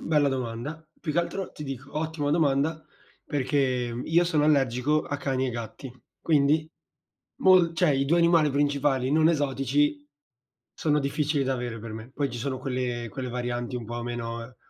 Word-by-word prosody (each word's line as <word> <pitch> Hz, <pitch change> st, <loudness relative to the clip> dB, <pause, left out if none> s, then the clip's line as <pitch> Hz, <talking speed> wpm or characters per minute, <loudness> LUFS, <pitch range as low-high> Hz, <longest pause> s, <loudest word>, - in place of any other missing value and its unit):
bella 150 Hz, -3 st, +2 dB
domanda. 130 Hz, +5 st, -4 dB
Più 155 Hz, -, -3 dB
che 165 Hz, -, +1 dB
altro 180 Hz, +2 st, -2 dB
ti -, -, -8 dB
dico, 135 Hz, +2 st, -7 dB
ottima 155 Hz, -2 st, -2 dB
domanda 155 Hz, 0 st, +1 dB, 0.4 s
perché 145 Hz, 0 st, -1 dB, 0.5 s
io 170 Hz, +4 st, +3 dB
sono 155 Hz, -4 st, +2 dB
allergico 140 Hz, 0 st, +2 dB
a 145 Hz, -, -4 dB
cani 130 Hz, -2 st, -1 dB
e -, -, -1 dB
gatti, 120 Hz, +2 st, -7 dB, 0.3 s
quindi 155 Hz, 0 st, +2 dB, 0.7 s
mol 180 Hz, -3 st, +6 dB
cioè 175 Hz, -1 st, +3 dB
i 135 Hz, -1 st, +2 dB
2 170 Hz, +5 st, +3 dB
animali 170 Hz, -3 st, +4 dB
principali 140 Hz, -2 st, +1 dB
non 160 Hz, +1 st, +5 dB
esotici 145 Hz, -1 st, +1 dB, 0.7 s
sono 150 Hz, -1 st, +1 dB
difficili 145 Hz, +1 st, 0 dB
da 135 Hz, 0 st, 0 dB
avere 120 Hz, -2 st, -4 dB
per 115 Hz, 0 st, -7 dB
me. 110 Hz, +2 st, -8 dB
Poi 140 Hz, -1 st, -1 dB
ci -, -, -5 dB
sono 130 Hz, +1 st, -2 dB
quelle 125 Hz, -2 st, -3 dB
quelle 125 Hz, +5 st, -5 dB
varianti 120 Hz, 0 st, -3 dB
un 120 Hz, -, -4 dB
po' 120 Hz, +1 st, -5 dB
meno 115 Hz, 0 st, -5 dB
140 Hz, 165 wpm, -27 LUFS, 125-155 Hz, 0.7 s, mol